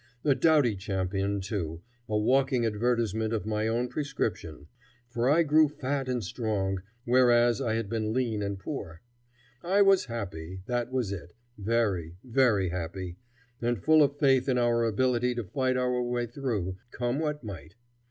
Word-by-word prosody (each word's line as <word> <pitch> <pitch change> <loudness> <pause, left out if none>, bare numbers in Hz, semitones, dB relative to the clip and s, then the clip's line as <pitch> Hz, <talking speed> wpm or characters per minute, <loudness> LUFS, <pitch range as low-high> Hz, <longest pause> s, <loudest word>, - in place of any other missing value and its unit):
A 145 - +4
doughty 140 -4 +3
champion, 95 0 -2
too, 90 -4 -4 0.3
a 105 - +1
walking 130 +2 +2
advertisement 110 0 0
of 105 - -3
my 110 0 -1
own 120 +2 0
prescription; 120 - -3 0.4
for 120 +1 0
I 165 +4 +5
grew 155 0 +4
fat 140 -2 -3
and 125 -3 -1
strong, 95 -2 -2 0.2
whereas 120 -2 +4
I 110 -1 0
had 115 -2 -2
been 110 0 -2
lean 115 -3 0
and 100 -1 -2
poor. 95 - -7 0.6
I 195 +4 +3
was 195 -1 +4
happy, 95 -6 -6
that 120 +1 -2
was 125 -6 -1
it; 85 -3 -7 0.2
very, 100 -6 -1
very 115 -7 +2
happy, 90 +1 -5 0.4
and 120 0 0
full 155 - +4
of 145 0 +2
faith 135 -2 +3
in 125 - +2
our 120 -1 +2
ability 125 +2 +1
to 120 - -2
fight 130 +5 -1
our 125 -1 +1
way 120 0 -1
through, 110 -7 -3
come 120 +3 -2
what 150 -3 -2
might. 90 -4 -9
115 Hz, 160 wpm, -28 LUFS, 100-130 Hz, 0.6 s, I